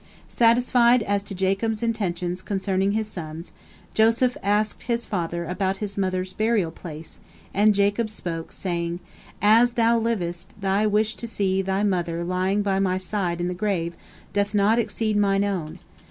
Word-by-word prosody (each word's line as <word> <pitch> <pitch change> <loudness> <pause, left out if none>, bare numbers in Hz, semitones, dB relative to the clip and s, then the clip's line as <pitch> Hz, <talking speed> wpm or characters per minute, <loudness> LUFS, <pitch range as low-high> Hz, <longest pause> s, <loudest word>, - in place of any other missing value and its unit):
Satisfied 240 0 +4
as 200 -1 0
to 200 0 -8
Jacob's 195 +4 0
intentions 185 -5 -2
concerning 195 0 0
his 220 0 0
sons, 165 -4 -8 0.4
Joseph 230 +3 +3
asked 205 +1 0
his 235 -1 -1
father 170 -4 -2
about 190 +2 -1
his 200 -1 -5
mother's 185 -1 -1
burial 215 -6 +1
place, 160 -1 -10 0.3
and 210 +1 +4
Jacob 205 +3 +1
spoke, 170 -6 -5
saying: 170 -2 -3 0.4
"As 230 +3 +5
thou 230 0 +3
livest, 190 -4 -3
thy 195 +2 +1
wish 215 +1 +1
to 235 - -5
see 195 -3 0
thy 195 +1 -1
mother 175 -4 0
lying 185 +3 0
by 195 -1 +1
my 185 -1 +1
side 185 -2 -2
in 175 - -1
the 180 - -2
grave 175 -3 -1 0.4
doth 205 +1 0
not 210 +3 +4
exceed 220 -2 -1
mine 200 -1 +3
own. 185 -6 -3
200 Hz, 155 wpm, -24 LUFS, 180-215 Hz, 0.4 s, As